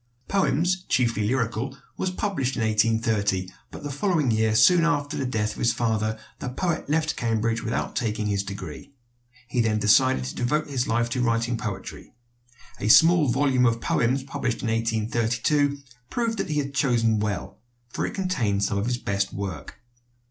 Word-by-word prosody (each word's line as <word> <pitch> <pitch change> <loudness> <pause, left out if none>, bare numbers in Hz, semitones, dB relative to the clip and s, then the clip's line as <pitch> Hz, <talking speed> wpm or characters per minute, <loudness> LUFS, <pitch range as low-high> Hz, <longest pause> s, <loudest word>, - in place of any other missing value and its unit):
"Poems, 185 -1 +1
Chiefly 115 -4 +1
Lyrical," 120 +2 -1 0.2
was 185 - -1
published 180 - -2
in 115 - -1
1830; 110 -4 +1 0.2
but - - -10
the 145 - -4
following 150 - +1
year, 110 0 +2
soon 175 +8 +6
after 145 -3 0
the 135 - -2
death 110 -4 -1
of - - -10
his 115 - +2
father, 110 -2 -1 0.2
the 125 - -4
poet 165 +4 -2
left 155 0 +1
Cambridge 115 0 0
without 115 - -3
taking 110 -2 -1
his 100 -1 0
degree. 100 - -8 0.6
He 125 0 0
then 110 -2 +1
decided 130 +6 +4
to 130 - -5
devote 150 +6 0
his 135 -3 -2
life 115 +1 +1
to 125 - -1
writing 115 0 +1
poetry. 110 -1 -6 0.6
A 100 - -2
small 165 +6 +6
volume 130 0 +3
of 115 0 +1
poems 125 +3 +1
published 130 -3 -3
in 115 - -1
1832 115 +5 0 0.3
proved 230 -3 -1
that - - -2
he 150 - -1
had 140 -1 -2
chosen 115 -6 +2
well; 105 -4 -3 0.3
for - - -3
it - - -3
contained 125 - 0
some 100 0 0
of 105 - -2
his 125 -1 0
best 100 -4 -1
work. 95 -2 -6
120 Hz, 170 wpm, -25 LUFS, 110-140 Hz, 0.6 s, soon